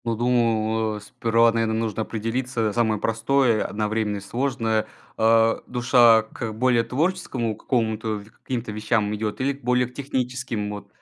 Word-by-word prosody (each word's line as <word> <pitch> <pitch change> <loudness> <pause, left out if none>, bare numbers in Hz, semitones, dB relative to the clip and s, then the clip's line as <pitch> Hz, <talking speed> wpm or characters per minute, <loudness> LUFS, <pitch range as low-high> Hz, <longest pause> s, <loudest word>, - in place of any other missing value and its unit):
Ну, 115 -1 0
думаю, 110 -2 +1
э, - - -7
сперва, 115 +2 +2
наверно, 115 -1 0
нужно 110 -1 -2
определиться, 115 0 -2
самое 110 -2 +1
простое, 115 +1 +2
одновременно 105 0 -2
и - - -5
сложное, 115 +1 -1 0.3
а, 115 0 +3
душа 120 -2 +5
к 110 0 -6
более 120 +1 +2
творческому 130 - -1
какому-то 110 -2 -1
в 100 - -10
к - - -33
каким-то 115 -4 -4
вещам 105 0 0
идет 105 0 -3
или 140 +2 +1
к 140 - -17
более 125 +1 +2
к 125 - -17
техническим, 125 -5 -3
вот. 105 0 -8
115 Hz, 160 wpm, -24 LUFS, 110-125 Hz, 0.3 s, душа